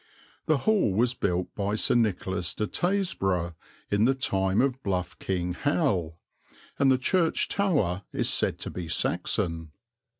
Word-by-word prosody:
The 155 Hz, -, +4 dB
Hall 195 Hz, -, +2 dB
was 120 Hz, +3 st, +3 dB
built 90 Hz, -6 st, -1 dB
by 100 Hz, 0 st, -1 dB
Sir -, -, +3 dB
Nicholas 95 Hz, -6 st, 0 dB
de 105 Hz, -, -1 dB
Tasburgh 95 Hz, -, 0 dB, 0.4 s
in 100 Hz, +2 st, +3 dB
the 135 Hz, +2 st, +3 dB
time 95 Hz, -6 st, 0 dB
of 130 Hz, 0 st, +1 dB
bluff 90 Hz, -5 st, -3 dB
King 90 Hz, -2 st, -2 dB
Hal, 95 Hz, -, 0 dB, 0.6 s
and 135 Hz, -1 st, +5 dB
the 130 Hz, -, +4 dB
church 165 Hz, +5 st, +1 dB
tower 140 Hz, -, +1 dB
is -, -, 0 dB
said -, -, +1 dB
to -, -, -4 dB
be 90 Hz, -2 st, -6 dB
Saxon. 85 Hz, -1 st, -1 dB
100 Hz, 145 wpm, -27 LUFS, 90-135 Hz, 0.6 s, and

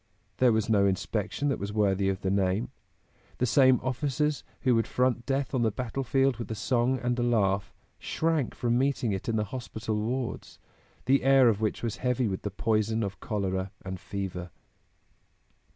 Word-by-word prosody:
There 125 Hz, -2 st, +5 dB
was 110 Hz, -1 st, +1 dB
no 100 Hz, -3 st, +4 dB
inspection 100 Hz, +8 st, -1 dB
that 140 Hz, -, -1 dB
was 100 Hz, +1 st, -4 dB
worthy 100 Hz, -2 st, +2 dB
of 95 Hz, 0 st, -2 dB
the 95 Hz, -, 0 dB
name. 100 Hz, +4 st, 0 dB, 0.7 s
The 125 Hz, -, +1 dB
same 130 Hz, +1 st, +5 dB
officers 145 Hz, +3 st, -1 dB, 0.2 s
who 130 Hz, -, +3 dB
would 115 Hz, -1 st, +2 dB
front 125 Hz, -2 st, 0 dB
death 135 Hz, 0 st, -1 dB
on 130 Hz, -, +1 dB
the 115 Hz, -, +3 dB
battlefield 135 Hz, +2 st, 0 dB
with 120 Hz, -, -6 dB
a 110 Hz, -, -3 dB
song 125 Hz, +3 st, +1 dB
and 125 Hz, 0 st, -1 dB
a -, -, +1 dB
laugh, 100 Hz, -5 st, +1 dB, 0.3 s
shrank 160 Hz, -5 st, -1 dB
from 120 Hz, 0 st, +1 dB
meeting 130 Hz, -4 st, +1 dB
it 95 Hz, +3 st, -3 dB
in 115 Hz, -, 0 dB
the 105 Hz, -, +1 dB
hospital 110 Hz, -3 st, -3 dB
wards, 125 Hz, +2 st, -3 dB, 0.5 s
the 135 Hz, +1 st, +4 dB
air 135 Hz, -2 st, +6 dB
of 110 Hz, -1 st, 0 dB
which 110 Hz, +1 st, -1 dB
was 115 Hz, -3 st, -2 dB
heavy 125 Hz, -1 st, 0 dB
with 95 Hz, -2 st, -3 dB
the 105 Hz, -, -3 dB
poison 110 Hz, +2 st, 0 dB
of 100 Hz, -1 st, -5 dB
cholera 95 Hz, -3 st, -2 dB, 0.2 s
and 95 Hz, -1 st, -5 dB
fever. 95 Hz, -3 st, -5 dB
115 Hz, 180 wpm, -28 LUFS, 100-130 Hz, 0.7 s, air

